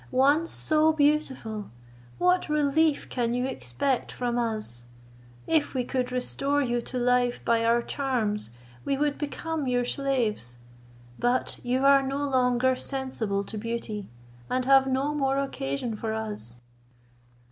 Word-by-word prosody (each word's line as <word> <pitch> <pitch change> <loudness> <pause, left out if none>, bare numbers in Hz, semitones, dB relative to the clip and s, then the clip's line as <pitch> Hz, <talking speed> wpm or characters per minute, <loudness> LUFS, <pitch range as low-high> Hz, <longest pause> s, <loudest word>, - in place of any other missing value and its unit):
once 285 +6 +3
so 310 0 +3
beautiful, 285 -8 0 0.5
what 360 -1 +2
relief 300 +1 +2
can 240 -1 -1
you 250 +1 0
expect 255 - -2
from 245 -1 -2
us? 215 - -2 0.6
If 315 -4 +1
we 255 - +1
could 250 0 -2
restore 275 +3 0
you 240 -3 0
to 255 - -5
life 245 0 +1
by 230 -1 +3
our 235 +1 +3
charms, 235 - -1 0.3
we 275 - 0
would 290 0 0
become 305 0 -3
your 245 -1 +1
slaves. 240 - -1 0.6
But 245 +1 0
you 255 +2 0
are 275 0 +7
no 275 +2 -2
longer 255 -1 +2
sensible 255 -7 -2
to 215 +2 -5
beauty, 225 -2 -4 0.4
and 255 0 0
have 270 0 +6
no 270 +3 0
more 275 -2 +1
occasion 225 - -2
for 220 +1 -3
us." 205 - -4
255 Hz, 135 wpm, -27 LUFS, 230-280 Hz, 0.6 s, are